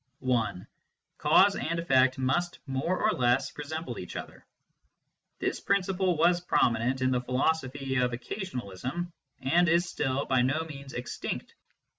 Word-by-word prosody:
(1) 120 -8 0
f - - -17 0.5
Cause - - +5
and 165 +1 -2
effect 130 -6 +3
must 155 +7 0
more 140 +7 -1
or 215 - +3
less 125 -3 +1
resemble 150 -4 -5
each 90 - -8
other, - - -7 1.0
j - - -4
This - - 0
principle 190 -3 +1
was 175 +2 +4
prominent 125 -5 +1
in 130 0 +2
the 125 -1 +1
philosophy 135 +1 0
of 125 0 +3
occasionalism, 130 - -5 0.3
and 170 +6 +3
is 170 +2 +3
still 135 -4 -1
by 130 -2 +2
no 135 +6 +1
means 140 -3 -9
extinct. 125 0 -5
135 Hz, 145 wpm, -29 LUFS, 125-170 Hz, 1.0 s, Cause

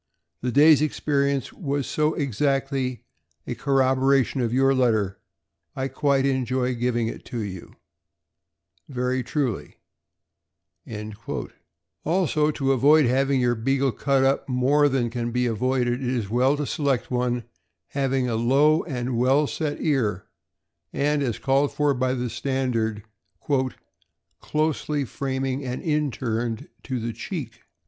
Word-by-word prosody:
The 125 - -1
day's 150 +2 +6
experience 140 -3 0
was 140 -4 -2
so 155 +1 0
exactly 135 -2 -1 0.4
a - - -3
corroboration 135 -1 +2
of 115 -2 0
your 135 +2 +3
letter, 110 -7 +1 0.6
I 135 0 -2
quite 140 -2 +1
enjoy 130 -1 0
giving 120 -1 0
it - - -6
to 120 - -4
you 95 -3 -8 1.1
Very 125 -1 -1
truly, 130 -2 -3 2.3
Also, 155 -3 +1
to 135 -3 0
avoid 145 +3 +5
having 135 +2 +2
your 120 -1 +2
Beagle 135 +3 +1
cut 135 +2 +1
up 135 +1 +1
more 140 +4 +3
than 125 -4 0
can 120 -1 -2
be 125 +1 0
avoided, 125 +1 0
it 125 - -1
is 115 -6 -2
well 130 +4 +3
to 150 - -2
select 140 -5 -1
one 125 -1 0 0.5
having 135 -2 0
a 115 - -1
low 140 +7 +4
and 125 -5 -3
well 135 +4 +4
set 145 0 -3
ear, 115 - 0 0.7
and 145 +1 +1
as 120 -6 -1
called 135 +4 +1
for 150 -1 +2
by 130 0 0
the 125 -2 -3
standard, 120 -6 -1 0.5
' 130 -1 -2
' - - -45
closely 150 -2 -1
framing 135 +2 -3
and 125 -1 -4
inturned 130 -3 -1
to 130 -3 -3
the 115 0 -3
cheek." - - -6
130 Hz, 135 wpm, -24 LUFS, 125-140 Hz, 2.3 s, day's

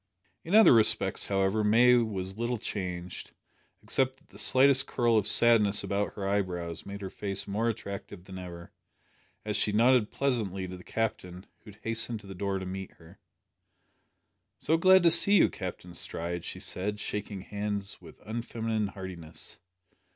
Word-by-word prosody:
In 175 +6 -1
other 220 -9 +8
respects, 110 -2 +4
however, 100 +2 0
May 120 +4 +5
was 100 -3 -2
little 120 +1 -1
changed, 90 -4 -6 0.5
except 130 0 0
that - - -29
the - - -13
slightest 135 0 +5
curl 120 -2 +1
of 105 -2 +2
sadness 105 -2 +4
about 100 +1 -2
her 100 -2 -4
eyebrows 90 -5 -3
made 100 0 -7
her 95 - -6
face 100 -1 -5
more 110 +4 -1
attractive 100 -4 -7
than 95 0 -9
ever, 85 -2 -10 0.7
as 105 -1 -2
she 105 - +2
nodded 115 +1 +3
pleasantly 105 -9 -2
to 90 - -8
the 90 - -12
Captain, 95 -4 -4
who - - -16
had 105 +1 -15
hastened 115 0 0
to - - -17
the 95 - -9
door 100 +1 -2
to 95 - -6
meet 95 +1 -7
her. 85 +3 -18 1.4
"So 160 - +1
glad 185 +2 +5
to 170 - +6
see 200 +5 +5
you, 195 - +5
Captain 90 -1 -7
Stride," 85 0 -2
she - - -6
said, 105 +3 -4
shaking 105 -2 -5
hands 100 0 -5
with 85 -3 -15
unfeminine 115 -1 -3
heartiness. 90 -4 -8
105 Hz, 165 wpm, -28 LUFS, 95-115 Hz, 1.4 s, other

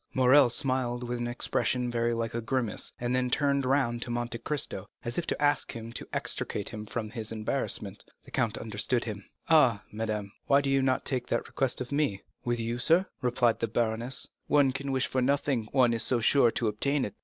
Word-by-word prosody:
Morrel 130 +1 +6
smiled 125 -1 -1
with 120 0 -3
an 120 - -2
expression 125 0 0
very 120 0 +1
like 115 -1 -2
a 115 - -2
grimace, 120 -2 -1
and 120 +1 0
then 130 0 +1
turned 140 0 +1
round 130 -3 +1
to 120 - -4
Monte 120 -1 -3
Cristo, 150 +2 -2 0.2
as 120 +7 -1
if 170 - -4
to - - -1
ask 145 0 +2
him 115 0 -7
to - - -6
extricate 100 - -2
him 105 -1 -7
from 110 -2 -4
his 110 -1 -5
embarrassment. 110 -2 -3 0.2
The - - -14
count 110 -1 0
understood 115 +3 -1
him. 105 -3 -7 0.2
"Ah, 130 -11 +5
madame," 110 -1 -2
he - - -15
said, - - -30
"why 140 0 +5
did 140 -1 -1
you 135 0 +3
not 130 +1 +1
make 125 -2 -1
that - - -1
request 135 -1 -1
of 125 - -5
me?" 140 -9 0 0.2
"With 120 -1 -1
you, 115 +1 -2
sir," 165 +8 +4 0.2
replied 125 -2 +2
the 115 - 0
baroness, 115 +3 -1 0.2
"one 140 -2 +4
can 135 +1 -3
wish 130 -1 +1
for 130 - -1
nothing, 130 -4 +1
one 125 -3 +4
is 115 - 0
so 125 - +2
sure 120 +2 +4
to 115 0 -1
obtain 140 +7 +1
it. 105 - -6
120 Hz, 215 wpm, -29 LUFS, 115-135 Hz, 0.2 s, Morrel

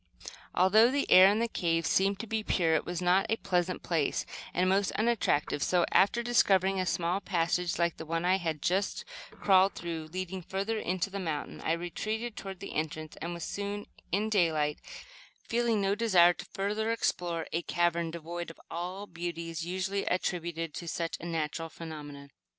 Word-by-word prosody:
Although 215 +6 +6
the 280 +2 0
air 185 +1 +9
in 210 - +1
the 230 +1 +1
cave 165 -6 0
seemed 195 +3 +2
to - - -6
be 220 0 -1
pure, 165 -5 +2
it 160 - +1
was 175 0 -3
not 180 +2 +3
a 225 - +3
pleasant 180 -4 -1
place, 165 -4 0 0.3
and 180 +1 +1
most 195 +1 +2
unattractive; 215 -10 +1
so, 175 +2 +3
after 235 +4 +4
discovering 195 -5 +3
a 185 - -1
small 175 +2 0
passage, 175 -1 0
like 170 -1 +1
the 160 - -7
one 165 +1 -1
I 185 +1 +4
had 160 -5 -3
just 190 +3 0 0.2
crawled 190 0 +3
through, 165 -2 -5
leading 185 +1 -4
further 200 +5 -2
into 185 +1 -2
the 200 - -4
mountain, 160 -5 -4
I 160 - +1
retreated 215 +7 -3
toward 190 -2 -7
the 200 - -6
entrance 155 0 -3
and 170 +1 -4
was 170 - -6
soon 205 0 -4 0.3
in 210 +4 0
daylight, 155 -7 +2 0.7
feeling 230 -2 +1
no 195 0 +2
desire 190 -6 +5
to - - -9
further 210 +3 -1
explore 175 -7 -1
a 165 - +1
cavern 170 -1 0
devoid 170 +1 -6
of 165 - -12
all 180 +4 -4
the 190 - -26
beauties 170 -1 -4
usually 190 +2 -2
attributed 170 -3 -2
to 170 - -6
such 165 0 -3
natural 165 -1 -3
phenomena. 150 -3 -9
180 Hz, 180 wpm, -30 LUFS, 165-200 Hz, 0.7 s, air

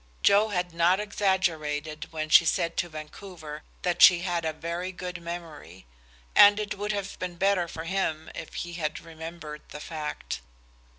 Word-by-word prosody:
Joe 205 +2 +6
had 180 -3 -2
not 170 +3 +3
exaggerated 160 -7 -1
when 155 -1 -3
she 165 - +8
said 170 0 0
to 175 - 0
Vancouver 155 0 -9 0.2
that 180 -1 0
she 175 -2 +9
had 175 -2 -1
a 160 - +1
very 170 +4 -4
good 180 -1 -6
memory, 165 - -8 0.5
and 205 +1 +8
it 210 -1 -3
would 205 +1 -2
have 200 -1 -4
been 180 -1 -4
better 190 -1 +2
for 160 -1 -6
him 165 -3 -2
if - - -8
he 175 0 -4
had 155 -3 -3
remembered 160 -2 -8
the 150 - -8
fact. 150 - -5
170 Hz, 165 wpm, -27 LUFS, 155-185 Hz, 0.5 s, she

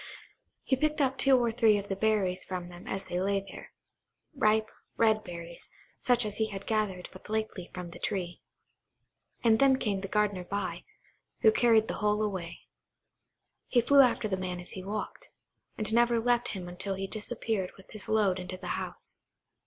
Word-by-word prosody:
He 265 - +2
picked 305 +3 0 0.2
two 270 -1 +6
or 240 -2 +1
three 225 -2 +4
of 200 0 -5
the 195 - -2
berries 195 -3 +1
from 180 -2 -5
them 175 0 -12
as 195 - -3
they 175 - -2
lay 200 +1 +1
there,–ripe, 215 - -3 0.3
red 220 -1 +3
berries, 170 -1 -8 0.3
such 245 -2 +3
as 210 -1 -3
he 220 - +1
had 200 -2 -7
gathered 210 -5 -1
but 185 - -13
lately 215 -4 -3
from 180 -2 -7
the - - -11
tree; 180 -4 -3 1.0
and 225 -2 +5
then 270 -1 +5
came 200 -6 -1
the 195 - -4
gardener 205 -2 0
by, 200 +3 -4 0.6
who 220 - +7
carried 225 -1 +4
the - - -2
whole 210 0 +2
away. 185 -5 -4 1.1
He 245 - +3
flew 280 +4 +5
after 245 -4 +3
the 190 -2 -1
man 180 -1 -4
as 180 - -9
he 185 - -7
walked, 210 +2 -5 0.5
and 215 0 0
never 235 0 +4
left 240 +1 +2
him 180 -1 -6
until 190 +2 -4
he 195 +1 -3
disappeared 215 -2 -3
with 190 - -17
his 215 -2 -7
load 205 -4 +2
into 185 0 -5
the 185 -1 -8
house. - - -8
210 Hz, 175 wpm, -30 LUFS, 185-225 Hz, 1.1 s, who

